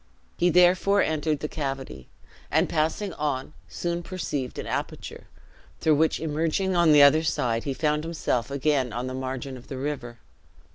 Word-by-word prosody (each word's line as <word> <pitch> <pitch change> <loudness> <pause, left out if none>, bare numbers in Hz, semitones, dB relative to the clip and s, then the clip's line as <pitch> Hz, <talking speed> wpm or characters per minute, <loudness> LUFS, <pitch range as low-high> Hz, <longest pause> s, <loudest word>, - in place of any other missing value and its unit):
He 175 - +2
therefore 180 +3 +4
entered 155 -1 -1
the 150 - -2
cavity, 135 - -5 0.4
and - - +2
passing 165 +5 -1
on, 145 -1 -3
soon 170 0 -3
perceived 160 -8 -4
an - - -4
aperture, - - -5 0.5
through 160 - +3
which 155 +2 +2
emerging 165 +4 0
on 170 -2 +5
the 145 -1 +8
other 145 +3 +6
side, 120 -7 -1
he 140 - -1
found 150 0 0
himself 155 -7 -1
again 140 -3 0
on 120 +2 -3
the 130 - -4
margin 130 0 -5
of 125 - -14
the 135 - -6
river. 130 -4 -4
150 Hz, 160 wpm, -26 LUFS, 130-165 Hz, 0.5 s, the